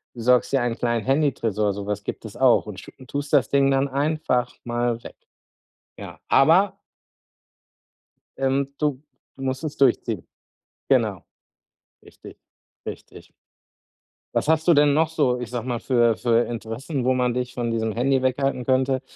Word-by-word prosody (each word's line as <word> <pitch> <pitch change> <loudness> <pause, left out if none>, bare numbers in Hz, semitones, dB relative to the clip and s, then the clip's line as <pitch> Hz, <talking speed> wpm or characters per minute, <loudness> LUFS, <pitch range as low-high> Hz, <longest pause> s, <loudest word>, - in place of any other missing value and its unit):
besorgst 125 +3 +2
dir 135 - +3
einen 120 -1 -1
kleinen 120 -3 -1
Handytresor, 115 -8 +1
so 100 0 -7
was 105 0 -3
gibt - - -6
es - - -9
auch - - +4
und - - -7
schu - - -12 0.2
tust 145 0 -5
das - - +4
Ding 140 -1 +3
dann 135 +1 +2
einfach 140 -2 -1
mal 120 0 -2
weg. - - -10 0.8
Ja, - - -9
aber 190 +7 +4 1.6
ähm, 135 +1 0
du 145 -2 -1 0.3
du 135 - -10
musst 130 +4 -3
es 150 - -4
durchziehen. 115 -7 +1 0.6
Genau. - - +1 0.8
Richtig, - - -14 0.5
richtig. - - -10 1.0
Was - - 0
hast 160 +2 +2
du 170 - +7
denn 145 0 +4
noch 160 +2 +2
so- 140 -6 +1
ich 120 -2 -6
sage 120 -1 -4
mal- 120 -2 -2
für 120 -4 +2
für 120 -1 +2
Interessen, 120 +4 -4
wo 130 0 +2
man 125 -1 +1
dich 125 0 -3
von 120 -1 -2
diesem 110 -1 -1
Handy 130 +4 +1
weghalten 130 0 0
könnte? 130 0 +2
130 Hz, 155 wpm, -23 LUFS, 120-140 Hz, 1.6 s, du